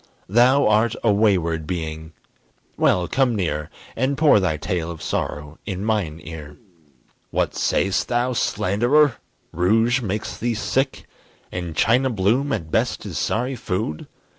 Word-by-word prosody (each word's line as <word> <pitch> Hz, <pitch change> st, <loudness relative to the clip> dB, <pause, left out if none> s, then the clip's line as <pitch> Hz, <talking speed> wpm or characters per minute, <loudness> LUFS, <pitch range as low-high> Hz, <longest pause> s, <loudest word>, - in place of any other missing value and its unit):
Thou 125 Hz, +7 st, +4 dB
art 110 Hz, +2 st, +3 dB
a 110 Hz, -3 st, +4 dB
wayward 85 Hz, -7 st, +1 dB
being 80 Hz, -2 st, -5 dB, 0.6 s
well, 90 Hz, -1 st, +2 dB
come 130 Hz, -3 st, +1 dB
near, 75 Hz, -6 st, -2 dB, 0.3 s
And 130 Hz, +4 st, 0 dB
pour 150 Hz, -8 st, +5 dB
thy 90 Hz, -5 st, 0 dB
tale 80 Hz, +2 st, -2 dB
of 85 Hz, -2 st, -7 dB
sorrow 75 Hz, +1 st, -4 dB
in 95 Hz, 0 st, -3 dB
mine 100 Hz, -8 st, -1 dB
ear. 75 Hz, -3 st, -9 dB, 0.7 s
What -, -, 0 dB
say'st 95 Hz, 0 st, 0 dB
thou, 125 Hz, +1 st, 0 dB
slanderer! 120 Hz, +6 st, +2 dB, 0.3 s
rouge 110 Hz, +8 st, +2 dB
makes 105 Hz, -1 st, -3 dB
thee 120 Hz, 0 st, -2 dB
sick? 130 Hz, +6 st, -1 dB, 0.5 s
And 85 Hz, -3 st, -5 dB
China 125 Hz, -, +3 dB
Bloom 120 Hz, +6 st, +1 dB
at 80 Hz, -, -3 dB
best -, -, 0 dB
is -, -, -4 dB
sorry 125 Hz, +4 st, -1 dB
food? 90 Hz, -8 st, -3 dB
105 Hz, 140 wpm, -22 LUFS, 85-120 Hz, 0.7 s, pour